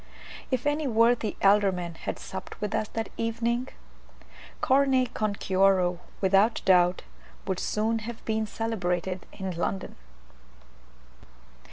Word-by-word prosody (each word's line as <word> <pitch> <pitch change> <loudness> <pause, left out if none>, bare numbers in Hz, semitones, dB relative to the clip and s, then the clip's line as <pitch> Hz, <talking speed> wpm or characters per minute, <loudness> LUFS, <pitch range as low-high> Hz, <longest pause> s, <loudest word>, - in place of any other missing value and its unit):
If 255 -1 -1
any 290 0 +1
worthy 230 -2 +2
alderman 195 -4 +3
had - - -5
supped - - -8
with 210 0 -3
us 220 -1 0
that 225 0 -3
evening, 235 +2 -1 0.9
"carne 265 -1 +3
con 215 -1 -1
cuero," 185 -2 +2 0.2
without 195 +4 +4
doubt, 180 -1 +4 0.4
would 190 - -2
soon 220 +2 0
have 230 +1 -8
been 220 -1 0
celebrated 185 -5 -2
in 190 -1 -5
London. 180 +2 -3
215 Hz, 115 wpm, -27 LUFS, 190-230 Hz, 0.9 s, without